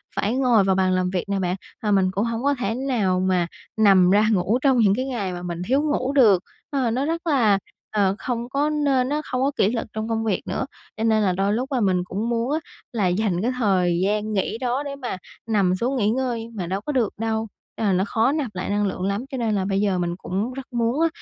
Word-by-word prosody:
phải 215 +4 0
ngồi 245 -6 +4
vào 190 0 +2
bàn 185 -1 +2
làm 185 0 +1
việc 180 -1 -1
nè 200 -1 0
bạn, 180 -1 0 0.3
và 210 - +1
mình 190 -2 +3
cũng 200 +4 0
hổng 230 +1 -3
có 285 +1 +3
thể 225 -1 -1
nào 235 -9 0
mà 185 -2 +1 0.3
nằm 195 -4 +6
ra 205 +3 +4
ngủ 200 +3 +2
trong 270 -2 +3
những 205 -4 +4
cái 255 - -2
ngày 220 -9 -3
mà 175 - -6
mình 175 -1 -5
thiếu 270 +4 +3
ngủ 285 -3 0
được. 210 -10 +5 0.3
Ờ, 260 -5 0
nó 260 +4 0
rất 335 +2 -3
là, 225 -10 +3 0.3
ờ, 200 -2 +2
không 240 -1 -3
có 285 +3 +1
nên 280 -4 +1
á, 300 +1 0
không 255 - -2
có 275 +2 +2
kỷ 195 - +3
luật 230 -1 -3
trong 220 +1 -3
công 225 0 0
việc 205 -4 0
nữa, - - -2 0.3
cho 220 - -2
nên 220 -1 +3
là 190 - +3
đôi 195 +3 +1
lúc 255 +5 -2
là 260 - +1
mình 185 -3 +2
cũng 200 +6 -3
muốn 235 +2 0
á 310 - +1 0.3
là 210 -6 +1
dành 180 -1 0
cái 240 +4 +1
thời 185 -7 +2
gian 210 +2 0
nghỉ 195 +2 -1
đó 250 +3 -1
để 280 -1 -5
mà 250 -8 -5 0.3
nằm 200 -5 +2
xuống 245 +8 -1
nghỉ 210 -5 +2
ngơi 235 -1 -2
mà 185 -5 -3
đâu 190 +3 -2
có 295 - -3
được 245 -7 +1
đâu, 225 0 -1 0.3
là 205 -4 +1
nó 185 +1 +2
khó 225 +5 +2
nạp 280 -9 -3
lại 185 - -3
năng 205 0 +1
lượng 190 - -4
lắm, 200 +6 -1
cho 265 - -3
nên 225 -3 0
là 190 -2 0
bây 195 0 0
giờ 200 -3 +1
mình 175 -1 -1
cũng 195 +7 -3
rất 270 0 -7
muốn 235 +5 +1
á 330 - +5
220 Hz, 255 wpm, -23 LUFS, 190-255 Hz, 0.3 s, nằm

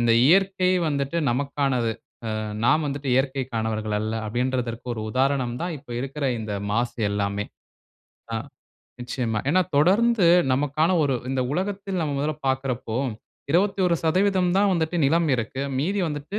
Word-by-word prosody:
இந்த 120 -1 +3
இயற்கை 190 +1 +3 0.2
வந்துட்டு 140 +2 -1
நமக்கானது. 135 -2 0 0.4
அ - - -2 0.3
நாம் 155 +5 +3
வந்துட்டு 140 0 -4
இயற்கைக்கானவர்கள் 115 -6 -1
அல்ல. 110 +1 -2 0.2
அப்டின்றதுக்கு 125 0 -2
ஒரு 110 - -5
உதாரணம் 130 -1 +1
தான், 175 -2 -2
இப்ப 130 -2 -17
இருக்குற 135 +2 -3
இந்த 105 -2 -4 0.2
மாசு 120 +2 -1
எல்லாமே. 100 0 -1 0.9
அ - - 0 0.7
நிச்சயமா. 120 -4 -2
ஏன்னா, 185 +3 +4
தொடர்ந்து 200 +5 +4 0.3
நமக்கான 145 +5 +1
ஒரு 135 - +1 0.2
இந்த 135 -1 0
உலகத்தில் 195 0 -2
நம்ம 145 -2 -2
முதல 155 +1 -1
பாக்குறப்போ, 130 -3 -2 0.5
21% 185 0 +2
தான் 200 -1 +4
வந்துட்டு 165 +1 -1
நிலம் 165 +2 +2
இருக்கு. 120 +3 -3 0.2
மீதி 195 +9 0
வந்துட்டு, 150 +8 -4
140 Hz, 130 wpm, -24 LUFS, 120-175 Hz, 0.9 s, ஏன்னா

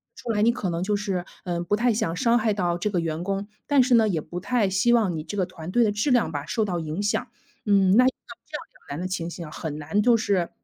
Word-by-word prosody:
出 235 - -4
来 210 -1 +1
你 235 +2 +4
可 205 -7 -3
能 170 +1 -2
就 205 +1 0
是， 195 -3 -2 0.2
嗯， 175 -1 -3
不 205 - +2
太 240 +1 +2
想 195 -7 -1
伤 235 0 +3
害 215 -1 +1
到 175 -3 0
这 210 +4 -1
个 180 -4 0
员 165 0 -3
工， 195 0 -2 0.2
但 285 -3 +5
是 250 -1 +4
呢， 220 -1 +5
也 165 -6 0
不 175 +3 -6
太 210 0 +1
希 205 +6 +3
望 210 -7 +3
你 155 - -3
这 205 - -6
个 185 -3 +1
团 175 -2 -9
队 240 +5 +3
的 210 - +2
质 215 +7 0
量 235 -9 +3
吧 145 -1 -4
受 220 +7 0
到 180 -4 -1
影 160 +5 -3
响。 205 - 0 0.4
嗯， 195 -2 +4
那 255 - +7
像 - - +6 0.4
这 - - -7
样 - - -5 0.2
两 140 - -5
难 - - -4
的 - - -3
情 175 -2 -3
形 170 -1 -7
啊， - - -11
很 150 -2 -5
难 160 +8 0
就 240 +1 +5
是 195 -6 0
195 Hz, 305 characters per minute, -25 LUFS, 175-220 Hz, 0.4 s, 那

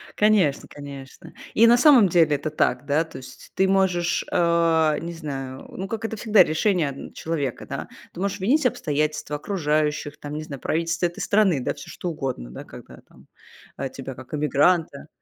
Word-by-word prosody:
Конечно, 210 -9 +2
конечно. 140 -2 -11 0.2
И 230 +1 +6
на 240 +1 +6
самом 250 - +6
деле 160 -4 +4
это 145 +2 -3
так. 150 -1 0
Да. 150 +3 +2
То 160 - -11
есть 130 - -12
ты 190 - +3
можешь, 190 -3 +1
э, 165 -3 +3
не 170 +1 -5
знаю, 135 -5 -6
ну, 190 - -6
как 225 +2 -5
это 225 - -3
всегда 210 -3 +5
решение 170 -1 +1
одн 135 - -9
человека, 145 -6 -3
да, - - -5 0.3
ты 175 - -10
можешь 200 +1 -2
винить 260 +10 +2
обстоятельства 150 - -1
окружающих, 150 -3 -1
там, 145 0 -7
не 155 - -4
знаю, 140 -3 -8
правительство 165 +2 -1
этой 170 - -3
страны, 200 -7 +2
да 125 - -2
всё 145 - -11
что 180 - -5
угодно, 135 - -4
да, 65 - -8
когда - - -13
там, - - -21 0.5
э, 135 -1 -3
тебя 135 0 -8
как 130 +3 -13
эмигранта 150 +1 +1
160 Hz, 180 wpm, -24 LUFS, 145-185 Hz, 0.5 s, И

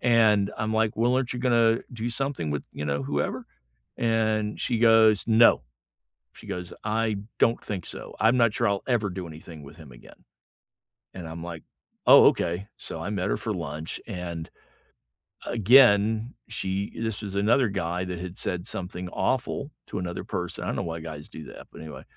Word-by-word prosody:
And 110 -4 +4
I'm 110 0 -1
like, 110 -1 +1
"Well, 120 +3 +2
aren't 130 -1 0
you 125 - -5
gonna 115 -2 +3
do 120 0 -3
something 135 - 0
with, 75 -1 -3
you 75 - -5
know, 70 -1 -1
whoever?" - - -2 0.5
And 110 -2 0
she 120 -3 0
goes, 110 -2 +5
"No," 115 +1 +6 0.7
she - - -15
goes, 90 0 -5
"I 110 0 0 0.2
don't 115 +1 +3
think 95 -5 -5
so, - - -7
I'm 115 +3 +4
not 115 -3 +4
sure 120 - +1
I'll 100 -1 -1
ever 115 -5 +1
do 90 -1 -6
anything 80 -1 -11
with 70 +2 -12
him 80 -5 -13
again." - - -16 0.9
And 85 -3 -8
I'm 80 +1 -7
like, 85 -3 -7 0.4
"Oh, - - +9
ok," 90 +4 +1
so 80 - -5
I 85 +5 -4
met 100 -2 -1
her - - +1
for 110 - -3
lunch 80 -3 -5
and 85 -5 -5 1.0
again, 110 -1 +5
she 100 -3 -3
this 110 -2 -3
was 100 -2 -6
another 115 +6 +3
guy 90 -2 -2
that 90 -1 -5
had 90 +1 -7
said 90 -1 -2
something 90 0 -4
awful 130 - -1 0.2
to 100 - -4
another 90 -1 -4
person- 90 -1 -4
I - - -4
don't - - -2
know - - -1
why 80 -1 -4
guys 80 -2 -8
do 80 - -10
that, - - -11
but - - -11
anyway- 80 -1 -9
100 Hz, 185 wpm, -26 LUFS, 85-115 Hz, 1.0 s, Oh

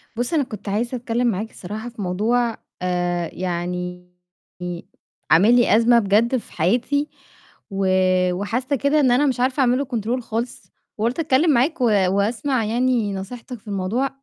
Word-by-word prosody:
بُص، 245 +6 -2
أنا 305 -3 +3
كنت 215 -5 -8
عايزة 235 +5 -1
أتكلم 240 0 -1
معاك 220 0 -2
الصراحة 215 +6 -7
في 235 -3 -9
موضوع، 225 +6 0 0.2
آآ 175 -1 -1
يعني 180 0 -4 1.2
عامل 205 +9 +6
لي 240 -3 +4
أزمة 235 +1 +5
بجد 225 +5 +2
في - - -10
حياتي 245 - +1 0.6
و 195 -1 -1 0.5
وحاسّة 235 +9 -1
كده 280 +3 +2
إن 265 -4 +4
أنا 255 +4 +4
مش 260 -4 0
عارفة 255 +2 +1
أعمل 250 -1 +3
له 280 - -1
control 230 +3 -1
خالص، 230 +1 -5 0.3
وقُلت 230 +7 -1
أتكلم 305 +1 +3
معاك 275 +4 +1
و - - +4 0.2
واسمع 225 +5 0
يعني 235 -2 +1
نصيحتك 235 +5 -7
في 215 - -26
الموضوع، 205 +7 -1
230 Hz, 155 wpm, -22 LUFS, 195-250 Hz, 1.2 s, عامل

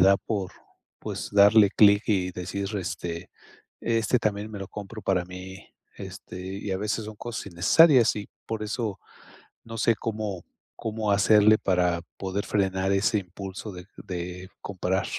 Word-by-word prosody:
da 95 +1 +6
por, 100 -5 -3 0.5
pues, - - -5
darle 100 0 +7
clic 105 0 +6
y 95 -4 +1
decir, 95 +2 -4
este, 85 -2 -4 0.5
este 115 +1 +1
también 105 -1 -2
me 105 - -6
lo 95 -1 -6
compro 105 +1 -8
para 90 -2 +1
mí, 90 +2 -10 0.3
este, 90 - -9 0.2
y 100 - -5
a - - 0
veces 105 +2 -2
son 110 - -8
cosas 115 -2 -6
innecesarias 120 - +5
y 105 - -5 0.2
por 110 -1 -3
eso 105 -1 -3 0.6
no 115 0 -7
sé 115 +1 +3
cómo 105 -4 -4 0.4
cómo 110 -1 -1
hacerle 105 +2 +6
para 90 -2 +1 0.2
poder 100 +1 -3
frenar 95 -1 0
ese 100 +2 +2
impulso 95 +2 -7
de 90 -1 -10 0.2
de 90 0 -6
comprar. 95 -1 -1
100 Hz, 150 wpm, -26 LUFS, 95-110 Hz, 0.6 s, darle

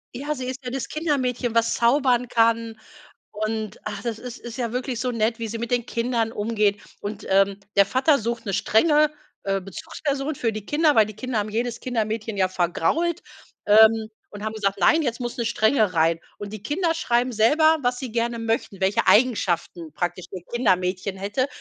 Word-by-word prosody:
Ja, 290 +4 -2
sie 255 -1 -5
ist 260 +1 -6
ja 250 - -5
das 265 -3 -3
Kindermädchen, 255 -6 -1
was 230 0 +2
zaubern 250 0 +2
kann, 230 -1 +1 0.5
und 215 0 -3
ach, 205 -1 -5
das 235 -3 -3
das 250 +1 -8
ist 235 -1 -9
ja 235 -2 -2
wirklich 250 -1 -3
so 250 0 -1
nett, 230 +1 0
wie 230 - -3
sie 225 +1 -5
mit 235 +1 -4
den 245 -1 0
Kindern 230 -1 -1
umgeht. 210 -2 0 0.2
Und, 205 0 -6
ähm, 195 +1 +2 0.2
der 200 -1 +6
Vater 275 +6 +3
sucht 235 +1 -3
'ne 195 - -2
strenge, 300 - +3 0.3
äh, 195 0 0
Bezugsperson 275 - -4
für 230 -4 -1
die 215 -1 -7
Kinder, 300 -2 +2
weil 215 -2 +6
die 215 - -9
Kinder 255 -2 -3
haben 210 +1 -1
jedes 235 +2 -2
Kindermädchen 220 -3 -3
ja 185 -1 +2
vergrault, 185 - 0 0.4
ähm, 220 +1 +6 0.2
und 205 0 -9
haben 220 0 -3
gesagt: 200 -2 -1
„Nein, 320 0 +4
jetzt 240 -3 -2
muss 240 -1 -4
'ne 235 - -2
Strenge 220 -3 +2
rein.“ 165 +1 +3 0.2
Und 205 0 -7
die 210 -2 -8
Kinder 330 +4 0
schreiben 245 -4 +1
selber, 310 +9 +4
was 245 +1 0
sie 255 -4 -5
gerne 235 0 -1
möchten, 225 -3 -2
welche 190 +2 +1
Eigenschaften 180 - +2
praktisch 175 0 -3
das 185 - -5
Kindermädchen 185 -4 0
hätte, 205 +7 -1
230 Hz, 190 wpm, -23 LUFS, 205-250 Hz, 0.5 s, der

